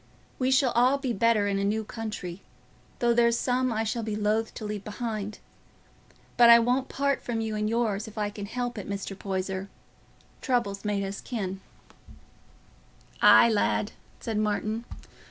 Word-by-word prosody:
We 255 0 +1
shall 265 -1 +3
all 250 +4 +3
be 265 -3 -2
better 220 -1 +2
in 200 -1 0
a - - -1
new 215 +2 0
country, 210 -5 -6 0.6
though 240 -1 +2
there's 235 0 +3
some 255 0 0
I 220 0 0
shall 225 +2 -2
be 215 -1 -3
loath 215 +1 0
to 215 - -6
leave 210 -1 -4
behind. 210 -1 -4 1.0
But 240 -1 +8
I 235 - +10
won't 250 +3 +1
part 280 0 0
from 235 -2 -3
you 220 -1 -2
and 210 0 -1
yours, 220 -3 0
if 220 - -12
I 205 -1 -1
can 205 -1 -7
help 245 0 -3
it, 200 - -8
Mr. 200 -1 -4
Poyser. 190 0 -4 0.7
Trouble's 235 -7 -1
made 205 -1 -1
us 195 +1 -5
kin." 195 -5 -4 1.6
"Aye, 235 - +7
lad," 210 0 +1 0.3
said 225 -2 -3
Martin. 215 +2 -1
220 Hz, 165 wpm, -27 LUFS, 205-235 Hz, 1.6 s, I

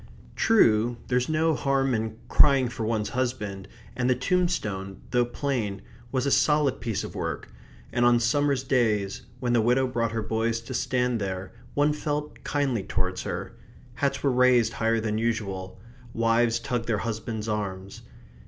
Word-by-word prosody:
True, 120 - +4
there's 125 +1 +1
no 160 +1 +2
harm 135 -2 +1
in 110 -1 -2
crying 135 -3 +5
for 120 -2 -5
one's 110 -1 -1
husband, 105 -7 -3 0.3
and 125 0 0
the 130 - +4
tombstone, 120 - -1
though 125 0 +3
plain, 120 -6 -2 0.3
was 130 0 0
a 140 - +1
solid 150 -2 +3
piece 115 -4 -2
of - - -7
work, - - -4 0.4
and 120 - +2
on 120 0 +5
summer's 140 +2 +1
days 110 -7 +1 0.2
when 125 -2 0
the 120 - +4
widow 125 +4 +3
brought 115 -3 -1
her 115 -1 -2
boys 115 +1 0
to 115 - -8
stand 125 -2 0
there 95 -1 -4 0.2
one 145 +1 +3
felt 150 0 -4
kindly 135 -6 0
towards - - -2
her. - - -5 0.4
Hats 140 +3 -1
were 140 - +3
raised 125 -2 +4
higher 115 0 +1
than 110 -1 -1
usual; 100 -5 -3 0.4
wives 115 0 +3
tugged 120 -1 -3
their 115 -2 +1
husbands' 110 -1 -4
arms. 100 -3 -4
120 Hz, 160 wpm, -26 LUFS, 110-130 Hz, 0.4 s, crying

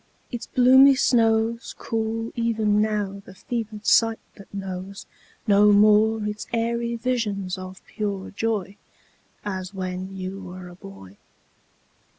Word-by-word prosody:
Its 240 - -5
bloomy 260 +2 +6
snows 230 -2 +1
Cool 225 0 -3
even 220 -3 +1
now 205 -2 -1
the 190 - -14
fevered 215 +1 -5
sight 225 +1 +4 0.2
that 200 - -15
knows 195 0 -6 0.4
No 205 -1 +5
more 215 +1 +4
its 210 0 -4
airy 235 0 -1
visions 220 -6 -2
of 185 0 -10
pure 200 -3 -4
joy 205 -2 -2 0.7
As 190 -1 -5
when 185 +1 -5
you 190 +1 -6
were 180 -1 -9
a - - -12
boy. 95 - -13
210 Hz, 125 wpm, -24 LUFS, 190-225 Hz, 0.7 s, bloomy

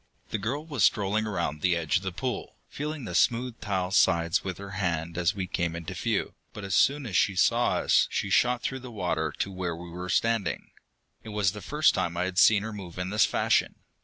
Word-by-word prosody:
The 110 - -1
girl 135 +9 -3
was 145 - -1
strolling 105 +3 +2
around 85 -7 -2
the 90 -2 +3
edge 80 -4 +1
of - - -4
the 95 0 -3
pool, 125 +7 -4
feeling 150 -2 -5
the 90 - -6
smooth 120 +5 +1
tile 95 -3 -2
sides 85 -3 +3
with 95 -2 -4
her 100 0 -8
hands 85 -3 -2
as 90 +3 +1
we 95 -2 -2
came 85 -2 -2
into 85 -1 -6
view, - - -1 0.2
but 105 - -8
as 95 -1 -3
soon 140 +5 +3
as 105 -7 -5
she 100 - +3
saw - - +3
us - - +3
she 100 - -2
shot 125 +3 +3
through 130 - -2
the 125 0 -9
water 90 -8 -2
to 100 - -2
where 90 -3 -3
we 85 +1 -9
were 90 +1 -6
standing. 115 -3 0 0.5
It 110 - -10
was 105 -3 +1
the 105 - -9
first 150 - +2
time 85 0 -2
I 90 - +1
had 90 -1 -1
seen 105 +2 +6
her 110 0 -5
move 95 -5 -9
in 90 +1 -3
this 105 - +4
fashion. - - +1
95 Hz, 225 wpm, -27 LUFS, 90-110 Hz, 0.5 s, seen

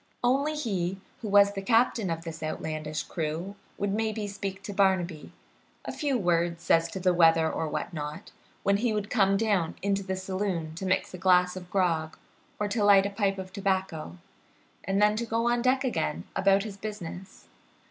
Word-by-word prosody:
Only 275 +5 +2
he 195 -9 -2 0.2
who 225 - -4
was 200 0 +6
the 195 - -4
captain 225 -1 +2
of 165 0 -3
this 165 -1 -7
outlandish 155 -1 -3
crew 165 +3 -4 0.2
would 200 -1 -1
maybe 220 0 -1
speak 195 -1 -5
to 205 - -6
Barnaby 185 -5 +1 0.5
a - - -3
few 285 -4 0
words 170 -3 0
as 165 0 +5
to 190 - -6
the 185 0 +3
weather 165 -2 +5
or 160 - -2
what 150 - -4
not 150 -1 -6 0.3
when 200 0 +3
he 230 +1 0
would 210 -1 -3
come 195 -4 +3
down 200 -6 +1
into 200 0 +1
the 190 -1 -3
saloon 185 -4 -3
to 185 +4 -5
mix 185 - 0
a 185 - -7
glass 180 -1 +4
of 180 -1 -8
grog 165 -5 0 0.4
or 210 - 0
to 210 +1 0
light 200 -1 +6
a 200 - -2
pipe 195 -1 0
of 185 0 -7
tobacco, 190 - -2 0.7
and 195 +1 0
then 210 0 +4
to 235 - -1
go 230 +1 0
on 240 0 +2
deck 255 +2 +2
again 85 - -1
about 195 0 +3
his 210 -3 -7
business. 195 -3 -8
195 Hz, 190 wpm, -28 LUFS, 170-205 Hz, 0.7 s, was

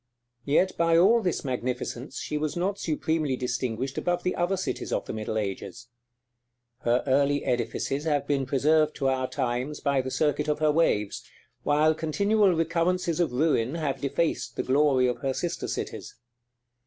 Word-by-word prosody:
Yet 180 +6 +2
by 165 0 +3
all 215 +7 +5
this 180 -6 -2
magnificence 125 0 -3
she - - -4
was 150 +2 -2
not 195 +3 -1
supremely 155 -3 -1
distinguished 125 +1 -2
above 175 0 -1
the 180 - 0
other 175 +2 0
cities 190 - -3
of - - -1
the - - -5
middle 110 0 -3
ages. 105 +3 -5 0.9
Her 120 0 +1
early 140 +1 +2
edifices 130 +3 -1
have 145 -3 +1
been 140 -2 0
preserved 155 +3 +2
to 135 -2 0
our 130 -1 -1
times 130 +2 -2
by 140 -2 +1
the 130 - -5
circuit 150 +1 0
of 150 - +1
her 155 0 +3
waves; 105 -10 +1 0.4
while 150 +2 +3
continual 200 +5 +2
recurrences 170 +1 0
of 170 -6 +1
ruin 130 -1 +1
have 140 -5 -2
defaced 140 +4 -1
the - - -1
glory 135 -1 +3
of 125 -1 0
her 135 -2 -2
sister 175 -1 -3
cities. - - -5
145 Hz, 165 wpm, -27 LUFS, 130-165 Hz, 0.9 s, all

